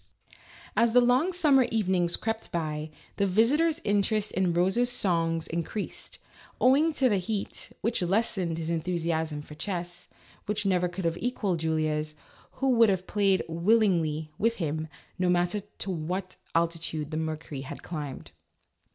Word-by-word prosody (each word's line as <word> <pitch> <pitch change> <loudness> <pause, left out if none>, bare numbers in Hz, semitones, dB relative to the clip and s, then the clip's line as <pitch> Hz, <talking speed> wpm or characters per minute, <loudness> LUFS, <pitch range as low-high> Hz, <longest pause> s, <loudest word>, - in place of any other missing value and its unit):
As 230 -1 +3
the 250 - +8
long 250 +8 +3
summer 290 -8 +4
evenings 185 -5 +2
crept 225 0 -3
by, 155 -2 -2 0.3
the 200 - +2
visi 225 +9 +4
tor's 330 0 +1
interest 205 +1 +1
in 185 -2 +1
Rose's 190 +8 +2
songs 165 -7 0
increased, 170 +5 -5 0.4
owing 285 +6 +5
to 270 -3 +3
the 205 -5 +2
heat, 200 +2 -4
which 230 -1 0
lessened 185 -3 0
his 165 0 -3
enthusiasm 160 -2 -1
for 150 - -11
chess 175 +1 -5 0.4
(which 210 0 -1
never 180 -2 +2
could 180 0 -5
have 165 +1 0
equalled 210 -8 -1
Julia's), 155 -1 -1 0.4
who 270 0 +1
would 230 -3 +6
have 185 -1 0
played 195 -2 +2
willingly 165 -4 +2
(with 230 +2 +2
him) 160 -3 -2 0.3
no 180 -1 +2
matter 175 +3 +2
to 200 -1 -6
what 180 +3 -3 0.2
altitude 165 -2 -1
the 155 - -2
mercury 155 -3 -4
had 135 - -8
climbed. 150 -5 -6
180 Hz, 150 wpm, -28 LUFS, 165-215 Hz, 0.4 s, the